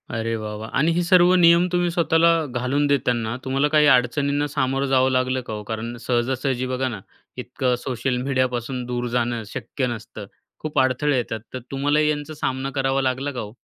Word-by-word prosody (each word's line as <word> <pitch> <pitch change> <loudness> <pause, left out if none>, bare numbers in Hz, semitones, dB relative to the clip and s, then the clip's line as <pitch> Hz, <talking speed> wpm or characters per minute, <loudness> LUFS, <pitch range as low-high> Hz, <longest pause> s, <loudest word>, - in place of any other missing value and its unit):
अरे 115 0 -1
वाह, 105 0 -5
वाह! 110 +1 -7
आणि 155 +4 +3
हे 175 - +1
सर्व 180 0 +5
नियम 170 0 +5
तुम्ही 175 -1 +1
स्वतःला 165 -1 +3 0.3
घालून 140 +4 0
देताना 120 -5 0
तुम्हाला 135 +2 +1
काही 150 0 +4
अडचणींना 140 +4 0
सामोरं 135 -1 -1
जावं 130 0 +3
लागलं 130 0 0
का 110 - -4
हो, 105 - -5
कारण 115 +2 -5
सहजासहजी 130 +1 0
बघा 130 +1 -1
ना, 110 -5 -5 0.4
इतकं 125 -1 -1
सोशल 125 0 -2
मीडियापासून 130 -1 -1
दूर 125 0 -3
जाणं 120 -1 -1
शक्य 130 +4 -4
नसतं. 110 -2 -7 0.3
खूप 150 -2 -2
अडथळे 130 +2 +2
येतात 115 -2 -3
तर 130 - -4
तुम्हालाही 145 +2 +1
यांचा 150 +1 -3
सामना 130 -2 -3
करावा 135 0 +1
लागला 130 +2 -1
का 125 - -6
हो? 105 -1 -7
130 Hz, 180 wpm, -22 LUFS, 120-145 Hz, 0.4 s, सर्व